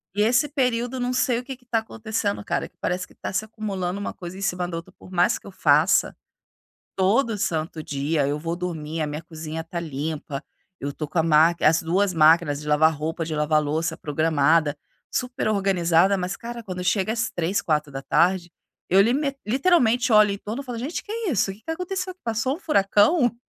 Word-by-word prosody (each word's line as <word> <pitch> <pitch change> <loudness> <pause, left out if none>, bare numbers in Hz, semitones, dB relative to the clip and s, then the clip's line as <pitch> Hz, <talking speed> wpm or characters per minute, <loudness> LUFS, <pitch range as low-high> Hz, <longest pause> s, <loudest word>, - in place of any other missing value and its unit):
E 210 - +1
esse 240 +6 +3
período, 250 -3 -1
não 245 0 -1
sei 250 -1 +1
o - - -8
que 265 0 -7
que 245 - -28
tá 235 -2 +1
acontecendo 220 -2 -3
cara, - - -2
que - - -45
parece 180 0 -2
que - - -21
tá - - -6
se 205 - 0
acumulando 200 -4 -4
uma 205 - -4
coisa 175 +1 -8
em - - -8
cima 180 -2 -1
da 170 -1 -4
outra. 170 +2 -9
Por 185 - -15
mais 180 0 +3
que - - -19
eu 200 - -9
faça, - - +3 0.8
todo 210 +4 +2
santo 160 -3 -2
dia 145 0 -1
eu 145 +1 -1
vou 165 +2 -3
dormir, 165 -3 -4
a - - -1
minha 150 +2 -5
cozinha 160 -1 -6
tá 170 +1 -6
limpa, 150 -2 -4 0.4
eu 140 +1 -3
tô 155 - -5
com 160 - -3
a - - +2
ma 160 +1 +5
as 160 +2 +4
2 185 +4 +1
máquinas 155 -2 +4
de 150 - -10
lavar 155 +2 +4
roupa, 160 +2 -3
de 155 -1 -4
lavar 150 0 +2
louça 155 +3 -1
programada, 155 0 +2 0.4
super 250 -1 -2
organizada. 195 -2 +3
Mas 185 +2 -3
cara, 235 +1 -7
quando 185 -3 -5
chega 195 +3 +1
às 225 -1 -1
15:00, 175 +3 -1
16:00, 155 +4 +1 0.4
eu 190 +2 +5
lime 275 +7 +2
literalmente 250 -3 +3
olho 215 -1 +6
em 200 - -3
torno 220 +7 -5
e - - -18
falo: 245 -3 -5
"Gente, 275 +8 -3
o - - -24
que 415 - -12
é 450 -4 -2
isso? 195 -4 +1
O - - -6
que 205 - -21
aconteceu? 365 +2 -3
Passou 235 - -1
furacão? 240 - +3
185 Hz, 205 wpm, -24 LUFS, 160-230 Hz, 0.8 s, olho